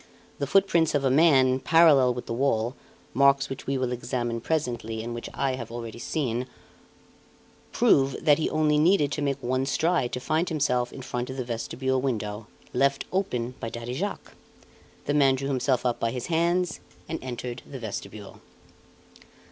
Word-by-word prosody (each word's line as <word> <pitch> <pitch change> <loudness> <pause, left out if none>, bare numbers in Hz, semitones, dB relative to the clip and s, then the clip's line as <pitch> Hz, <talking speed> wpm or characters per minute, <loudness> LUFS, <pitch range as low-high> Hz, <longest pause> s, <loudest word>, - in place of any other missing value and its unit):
The 140 - -1
footprints 170 -3 +3
of 140 -1 +1
a 130 - +3
man, 130 -4 +5
parallel 145 -6 +5
with 125 - -6
the - - -4
wall 120 -1 0 0.4
marks 140 0 +4
which 135 - -7
we 135 0 0
will 130 -1 -1
examine 120 -1 -3
presently, 115 -7 -2
and 120 +1 -5
which 120 - -6
I 135 -1 -1
have 120 -3 -6
already 115 -1 -7
seen 125 -3 -2 1.2
prove 135 -1 +3
that 150 -1 +5
he 155 - 0
only 150 -1 +2
needed 155 -3 +3
to 150 - -2
make 140 -2 0
one 130 +2 0
stride 160 -3 +1
to - - -2
find 160 +7 0
himself 125 -6 0
in 135 - -9
front 125 0 -4
of 130 - -6
the 130 - -3
vestibule 130 +3 -2
window, 105 -4 -3 0.3
left 140 +2 +1
open 125 -11 -1
by 115 - -4
Daddy 115 +1 -6
Jacques. 195 +10 -4 0.7
The 145 - 0
man 135 -2 +4
drew 135 +1 -3
himself 130 -1 0
up 120 -1 0
by 115 - 0
his 125 +1 -4
hands 170 0 +1 0.3
and 160 - -4
entered 125 -1 -5
the 140 - -7
vestibule." 105 -2 -7
130 Hz, 170 wpm, -26 LUFS, 120-150 Hz, 1.2 s, man